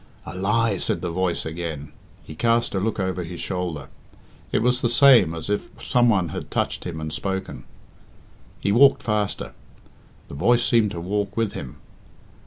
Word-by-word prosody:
"A - - -8
lie!" 105 +1 +1
said - - -1
the 85 - -3
voice 90 0 -1
again. 80 -3 -5 0.3
He - - -10
cast 115 +7 +1
a 95 - 0
look 110 +2 -2
over 95 -1 -1
his 85 0 -8
shoulder. 85 -7 -4 0.6
It - - +1
was 125 +1 +2
the 120 - +1
same 120 - +6
as 80 -1 -6
if 105 0 -2
some 120 -1 +3
one 95 -7 +2
had - - -6
touched - - -2
him 80 -2 -5
and 80 -1 -5
spoken. 95 -9 -4 0.9
He 100 - 0
walked 135 +6 +5
faster. 105 -2 -2 0.7
The - - -11
voice 120 +12 +3
seemed 115 -3 +3
to 85 - -6
walk 100 +5 -3
with 115 -2 +1
him. 65 - -7
95 Hz, 175 wpm, -23 LUFS, 85-115 Hz, 0.9 s, same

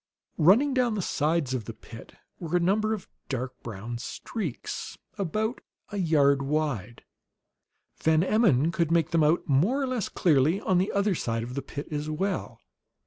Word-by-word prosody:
Running 230 - +5
down 250 -4 +2
the 200 - -1
sides 155 -4 0
of 120 -5 -3
the - - -7
pit - - -12 0.2
were 170 +1 0
a - - +2
number 210 +5 +2
of 195 - -11 0.2
dark 130 -1 -4
brown 115 +2 -6
streaks, 170 - -5 0.2
about 215 +6 -2 0.3
a 205 - -5
yard 145 -6 +3
wide; 135 -6 -2 1.0
Van 160 +1 +3
Emmon 180 - +3
could 170 -2 0
make 165 -1 +2
them 165 -2 +3
out, 155 +4 +2
more 170 - +3
or 275 - 0
less 255 -6 -2
clearly, 155 +2 +3
on 185 -3 +2
the 190 - 0
other 200 0 +1
side 115 -8 -2
of 120 +2 -6
the 140 - -3
pit 145 +2 -7
as 150 0 -3
well. 190 +6 -2
165 Hz, 170 wpm, -27 LUFS, 140-200 Hz, 1.0 s, Running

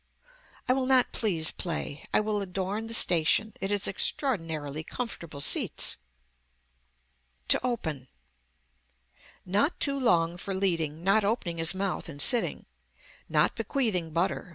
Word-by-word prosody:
I 255 - +3
will 260 -1 -1
not 260 -1 +4
please 170 -8 0
play. 155 -4 -6
I - - +2
will 210 -1 -2
adorn 195 +3 -4
the 230 - -3
station. 180 +4 +4
It 195 - -3
has 205 -1 0
extraordinarily 165 - -1
comfortable 170 - -6
seats. - - +4 1.5
TO - - +6
OPEN 160 - -4 1.4
Not 205 - 0
too 280 -1 +3
long 170 -8 +1
for 195 +2 -5
leading, 165 -5 -2
not 200 +3 +2
opening 200 -6 -2
his 165 +3 +4
mouth 190 -2 -4
and 145 -3 -10
sitting. 235 - +3 0.6
Not - - +2
bequeathing 215 - -2
butter. 170 +3 -2
190 Hz, 130 wpm, -27 LUFS, 165-220 Hz, 1.5 s, TO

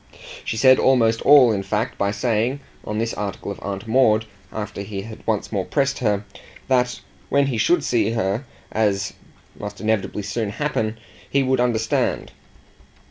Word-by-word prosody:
She - - -3
said 130 +2 +6
almost 115 -4 +3
all 140 -4 +7
in 100 -2 0
fact 105 +4 -2
by 100 - +2
saying, 120 +5 0 0.2
on 105 - -4
this 115 +1 -1
article 100 -1 -4
of 100 - -7
Aunt 100 +2 -5
Maud, 110 -2 +4 0.3
after 105 -2 -5
he 100 -1 -5
had 110 +2 -9
once 110 -3 -1
more 100 -3 0
pressed 140 +5 0
her, 105 -3 0 0.4
that 125 -2 +1 0.3
when 140 0 +3
he 125 -5 -1
should 170 +6 +3
see 110 -6 +1
her, 110 +2 -1 0.3
as 100 -3 0 0.5
must 105 0 -6
inevitably 105 -2 -1
soon 110 +1 -2
happen, 110 -3 -2 0.3
he 140 0 +2
would 130 -1 +1
understand. 115 -2 0
110 Hz, 160 wpm, -22 LUFS, 105-125 Hz, 0.5 s, all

